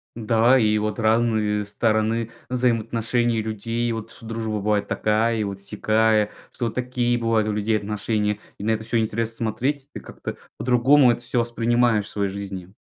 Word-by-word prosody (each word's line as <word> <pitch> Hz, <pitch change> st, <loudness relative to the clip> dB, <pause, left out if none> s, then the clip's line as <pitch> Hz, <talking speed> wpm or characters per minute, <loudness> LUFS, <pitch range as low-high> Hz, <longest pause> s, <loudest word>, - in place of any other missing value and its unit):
Да, 115 Hz, +3 st, +3 dB
и 105 Hz, -2 st, +3 dB
вот 105 Hz, +1 st, -2 dB
разные 110 Hz, -2 st, +2 dB
стороны 110 Hz, +2 st, 0 dB, 0.2 s
взаимоотношений 120 Hz, -1 st, 0 dB
людей. 115 Hz, +2 st, -2 dB
Вот 110 Hz, -1 st, -6 dB
что 115 Hz, -, -11 dB
дружба 110 Hz, -1 st, -3 dB
бывает 100 Hz, 0 st, 0 dB
такая 110 Hz, +2 st, +1 dB
и 110 Hz, -, 0 dB
вот 100 Hz, -1 st, -5 dB
сякая, 110 Hz, +1 st, +1 dB, 0.2 s
что 120 Hz, -, -3 dB
вот 115 Hz, -, -3 dB
такие 125 Hz, -1 st, 0 dB
бывают 115 Hz, -2 st, +1 dB
у -, -, 0 dB
людей 105 Hz, +1 st, +1 dB
отношения, 105 Hz, 0 st, -1 dB, 0.2 s
и -, -, -6 dB
на 110 Hz, -, +1 dB
это 110 Hz, 0 st, -1 dB
всё 115 Hz, +1 st, 0 dB
интересно 115 Hz, +1 st, -1 dB
смотреть. 130 Hz, +5 st, -2 dB
Ты -, -, -7 dB
как-то -, -, -8 dB, 0.2 s
по-другому 125 Hz, +2 st, +5 dB
это 120 Hz, -, -3 dB
всё 120 Hz, +1 st, 0 dB
воспринимаешь 120 Hz, -2 st, +2 dB
в -, -, -11 dB
своей 100 Hz, -1 st, -1 dB
жизни. 95 Hz, -2 st, -7 dB
110 Hz, 170 wpm, -23 LUFS, 105-120 Hz, 0.2 s, по-другому